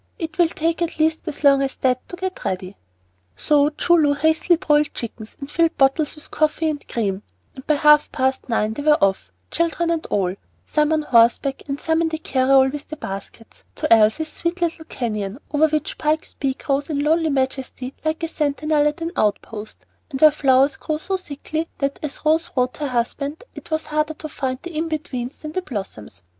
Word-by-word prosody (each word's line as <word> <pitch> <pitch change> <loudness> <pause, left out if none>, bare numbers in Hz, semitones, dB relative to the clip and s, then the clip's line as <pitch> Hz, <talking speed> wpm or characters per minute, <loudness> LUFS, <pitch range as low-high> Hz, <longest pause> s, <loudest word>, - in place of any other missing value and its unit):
It 320 -1 -6
will 345 - +6
take 330 +1 -1
at 340 - -1
least 315 +2 +1
as 305 -1 -5
long 275 -1 +6
as 270 -1 -2
that 255 -1 0
to - - -6
get 375 +1 -5
ready." 185 +1 -3 0.6
So 290 - +3
Choo 345 +3 +2
Loo 295 -3 +3
hastily 315 +4 +3
broiled 300 -4 +1
chickens 225 -2 -6
and 275 - -6
filled 330 +2 +1
bottles 280 +3 +2
with 300 - -11
coffee 310 +1 +1
and 290 -1 -8
cream; 200 -5 -2 0.3
and 265 0 -12
by 305 - +4
half 300 +1 +5
past 260 0 -1
nine 220 -1 +1
they 255 - -5
were 300 0 +4
off, 195 -1 +1 0.2
children 335 0 0
and 330 -2 -1
all, 185 -3 0 0.3
some 300 0 +1
on 310 -1 +2
horseback, 245 +2 +3
and 280 0 -3
some 320 +1 +1
in 330 - +1
the 320 - -3
carryall 265 -2 +3
with 295 0 -7
the 310 - -6
baskets, 200 +1 -8
to - - +3
Elsie's 225 +9 +3
"sweet 340 +3 -3
little 330 -1 -1
canyon," 215 -6 -3
over 305 +1 +4
which 305 -1 -2
Pike's 310 +1 0
Peak 270 -1 -3
rose 280 +1 0
in 285 -2 -1
lonely 320 +2 +2
majesty 265 -1 -2
like 315 +1 -2
a - - +1
sentinel 300 -1 +1
at 295 +2 -3
an 330 +1 -2
outpost, 215 0 -2 0.2
and 270 -3 -5
where 310 +1 +8
flowers 275 -1 +3
grew 310 - -2
so 385 +5 -3
thickly 315 -2 -4
that, 275 0 -2
as 300 0 -6
Rose 320 +2 +2
wrote 250 0 +1
her 295 - -2
husband, 280 - -2
"it - - -11
was 315 0 -1
harder 305 +1 -1
to 310 - -7
find 265 -4 -3
the 345 -2 -7
in 320 +2 -1
betweens 285 -5 -4
than 305 - -5
the 370 - -2
blossoms." 190 - -7
295 Hz, 200 wpm, -21 LUFS, 260-315 Hz, 0.6 s, where